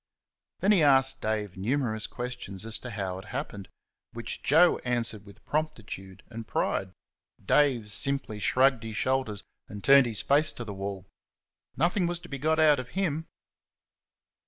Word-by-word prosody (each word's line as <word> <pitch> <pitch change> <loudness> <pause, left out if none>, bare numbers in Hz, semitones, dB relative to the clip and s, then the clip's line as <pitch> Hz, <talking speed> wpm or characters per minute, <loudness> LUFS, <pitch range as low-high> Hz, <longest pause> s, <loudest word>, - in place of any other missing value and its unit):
Then 200 - +4
he 195 -5 +5
asked 135 -2 +4
Dave 105 -4 -2
numerous 110 +1 -1
questions 120 -5 -6
as 115 -1 -3
to 125 - -8
how 95 -4 -4
it 95 - -11
happened, 105 -6 -6 0.4
which 115 -1 -5
Joe 165 +5 +5
answered 115 -4 -2
with 100 - -16
promptitude 110 -11 -4
and 115 -1 -7
pride. 95 -1 -1 0.5
Dave 125 -8 +2
simply 130 -1 0
shrugged 130 +4 +3
his 110 -1 -6
shoulders 130 -6 -1 0.2
and 105 0 -9
turned 140 -2 +7
his 110 -3 -2
face 150 +3 +3
to 120 - -7
the 105 - -6
wall. 95 -1 -5 0.7
Nothing 175 +4 +2
was 175 0 -2
to - - -12
be 140 - -5
got 160 +3 +1
out 150 -3 +5
of 125 -1 -6
him. 160 -4 -1
120 Hz, 160 wpm, -28 LUFS, 105-140 Hz, 0.7 s, turned